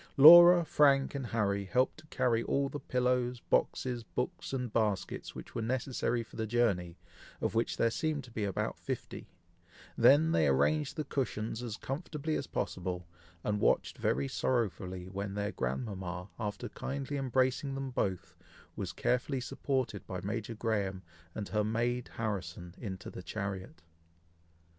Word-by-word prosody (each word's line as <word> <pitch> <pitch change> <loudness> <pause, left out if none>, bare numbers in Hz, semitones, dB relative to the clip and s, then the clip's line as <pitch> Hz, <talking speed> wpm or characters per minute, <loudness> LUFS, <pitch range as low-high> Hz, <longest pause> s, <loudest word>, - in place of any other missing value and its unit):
Laura, 175 +4 +10
Frank, 140 -3 +4
and 135 -3 -3
Harry 100 -3 0
helped 125 +9 +1
to 155 - -16
carry 125 -5 +1
all 140 +3 0
the 145 - -5
pillows, 125 -2 0
boxes, 125 +1 0
books, 150 +10 -4
and 125 -4 -3
baskets 105 -4 -1
which - - -9
were - - -2
necessary 120 0 -1
for 115 - -14
the 110 -1 -2
journey, 95 -7 +1 0.4
of - - -1
which 115 +1 0
there 115 - +3
seemed 155 +2 -1
to 120 - -13
be 110 -2 -3
about 100 -2 -2
fifty; - - -5 0.7
then 155 +4 +6
they 80 - +3
arranged 135 - +2
the 155 - 0
cushions 115 -5 -2
as 115 -4 -4
comfortably 155 +2 -4
as 140 - -3
possible, 90 -1 -3 0.4
and 105 -1 0
watched - - +2
very 70 +2 +1
sorrowfully 95 - -1
when 100 +1 -4
their 105 0 -1
grandmama, 90 - -4
after 110 +2 -3
kindly 140 +1 -4
embracing 130 +1 +1
them 135 -1 -4
both, 95 -7 -2 0.4
was - - -4
carefully 130 +2 0
supported 125 -5 -2
by 95 - -4
Major 110 +3 -3
Graham 100 -4 -1 0.3
and 105 -2 -4
her 105 -1 +1
maid 120 +3 -1
Harrison, 90 -6 -4
into 95 -6 -6
the - - -7
chariot. 95 -4 -5
115 Hz, 150 wpm, -32 LUFS, 100-130 Hz, 0.7 s, Laura